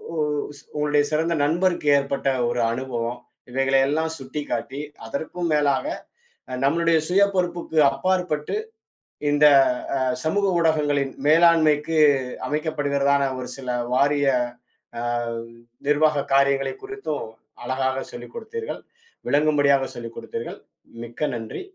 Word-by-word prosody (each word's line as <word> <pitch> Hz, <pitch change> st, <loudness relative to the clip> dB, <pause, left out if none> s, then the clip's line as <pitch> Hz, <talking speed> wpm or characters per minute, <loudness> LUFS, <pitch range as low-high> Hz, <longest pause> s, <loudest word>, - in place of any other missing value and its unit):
உஸ் 150 Hz, -2 st, -2 dB, 0.2 s
உங்களோட 150 Hz, 0 st, +3 dB
சிறந்த 160 Hz, +2 st, +1 dB
நண்பருக்கு 170 Hz, +1 st, +1 dB
ஏற்பட்ட 140 Hz, 0 st, -2 dB, 0.2 s
ஒரு 120 Hz, 0 st, -1 dB
அனுபவம் 120 Hz, -1 st, -3 dB, 0.3 s
இவைகளை 135 Hz, +1 st, +2 dB
எல்லாம் 160 Hz, +3 st, 0 dB
சுட்டிக்காட்டி 135 Hz, -1 st, -4 dB, 0.3 s
அதற்கும் 160 Hz, +8 st, -4 dB
மேலாக 145 Hz, -, +2 dB, 0.8 s
நம்மளுடைய 165 Hz, +3 st, +3 dB
சுய 190 Hz, +3 st, +4 dB
பொறுப்புக்கு 175 Hz, -3 st, -1 dB
அப்பாற்பட்டு 160 Hz, 0 st, -1 dB, 0.8 s
இந்தச் 145 Hz, -1 st, +6 dB, 0.4 s
அ -, -, -1 dB, 0.2 s
சமூக 200 Hz, +6 st, +1 dB
ஊடகங்களின் 145 Hz, -4 st, +1 dB
மேலாண்மைக்கு 160 Hz, -1 st, +4 dB, 0.5 s
அமைக்கப்படுகிறதான 140 Hz, -2 st, +1 dB, 0.2 s
ஒரு 125 Hz, -, -5 dB
சில 130 Hz, -2 st, -7 dB, 0.2 s
வாரிய 140 Hz, +2 st, +2 dB, 0.7 s
அ -, -, -3 dB, 0.9 s
நிர்வாக 150 Hz, -1 st, +3 dB
காரியங்களைக் 135 Hz, -1 st, +2 dB
குறித்தும் 400 Hz, -, -4 dB, 0.4 s
அழகாகச் 130 Hz, +1 st, -2 dB
சொல்லிக் 120 Hz, 0 st, -10 dB
குடுத்தீர்கள். 455 Hz, 0 st, -6 dB, 0.5 s
விளங்கும்படியாகச் 145 Hz, -2 st, +3 dB
சொல்லிக் 115 Hz, -1 st, -8 dB
குடுத்தீர்கள். 115 Hz, 0 st, -6 dB, 0.4 s
மிக்க 120 Hz, +6 st, -3 dB
நன்றி. 115 Hz, -, -6 dB
145 Hz, 100 wpm, -23 LUFS, 135-160 Hz, 0.9 s, இந்தச்